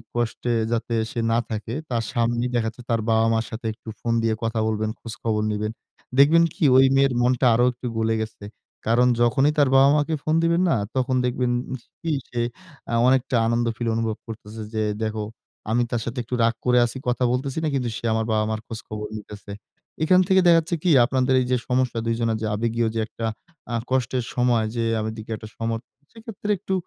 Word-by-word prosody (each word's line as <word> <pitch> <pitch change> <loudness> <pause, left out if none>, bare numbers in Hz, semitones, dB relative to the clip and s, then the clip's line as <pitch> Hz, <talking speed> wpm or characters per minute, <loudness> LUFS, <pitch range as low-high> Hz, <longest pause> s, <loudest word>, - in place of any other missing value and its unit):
কষ্টে 120 0 -1 0.2
যাতে 115 0 -1 0.2
সে 120 - -4
না 115 - +3
থাকে, 110 +1 -4 0.2
তার 115 -2 0
সামনেই 120 0 0
দেখা 115 -1 +1
যাচ্ছে 115 +2 -7
তার 115 -1 +1
বাবা-মার 115 0 +2
সাথে 110 +1 -7
একটু 110 - -12
ফোন 115 - -1
দিয়ে 110 -1 +1
কথা 115 0 -1
বলবেন, 110 0 -1
খোঁজখবর 110 -2 -3
নিবেন। 105 +1 -2 0.5
দেখবেন 165 +4 +7
কি 195 - -4
ঐ - - +8 0.2
মেয়ের 135 -1 +4
মনটা 125 +1 +2
আরো 120 +2 +4
একটু 125 0 -7
গলে 110 0 +1
গেছে। 110 -1 -7 0.4
কারণ 120 +2 +4
যখনই 135 +5 +3
তার 140 -3 +4
বাবা-মাকে 145 +3 +4
ফোন 155 +1 +1
দিবেন 170 +1 +2
না? - - +3 0.2
তখন 130 0 +1
দেখবেন 125 0 0 0.5
কি? 165 -1 -2 0.2
সে 120 -1 -2 0.5
আ - - -2
অনেকটা 130 0 +2
আনন্দ 115 +1 +1
ফিল 120 - -2
অনুভব 115 -1 -1
করতেছে। 110 0 -8
"যে 110 0 0 0.2
দেখো 110 -1 -2 0.5
আমি 120 +1 +3
তার 120 - 0
সাথে 120 +1 -5
একটু 125 +2 -3
রাগ 115 0 +3
করে 125 0 +4
আছি, 120 - -5
কথা 125 +1 +1
বলতেছি 130 +3 -2
না, 155 - +1
কিন্তু 125 -3 -1
সে - - -7
আমার 110 0 0
বাবা-মার 110 0 0
খোঁজখবর 110 -1 -6
নিতেছে।" 105 -1 -10 0.5
এখান 180 +3 +5
থেকে 190 -1 +5
দেখা 170 -1 +7
যাচ্ছে 170 +2 -2
কি? 175 - +3
আপনাদের 130 +1 +1
এইযে 125 0 +1
সমস্যা 125 -2 +1
২ 115 - +1
জনের 115 -1 0
যে 110 - -1
আবেগীয় 115 +1 0
যে - - 0
একটা 115 - -6 0.5
আ - - +1 0.2
কষ্টের 130 -1 0
সময়। 120 -3 +2
যে 115 - 0 0.2
আমার 110 0 -3
দিকে 110 +1 -8
একটা 110 0 -10
সম 115 0 -2 0.4
সেক্ষেত্রে 225 -2 -5
একটু 190 0 -4
120 Hz, 195 wpm, -23 LUFS, 110-130 Hz, 0.5 s, ঐ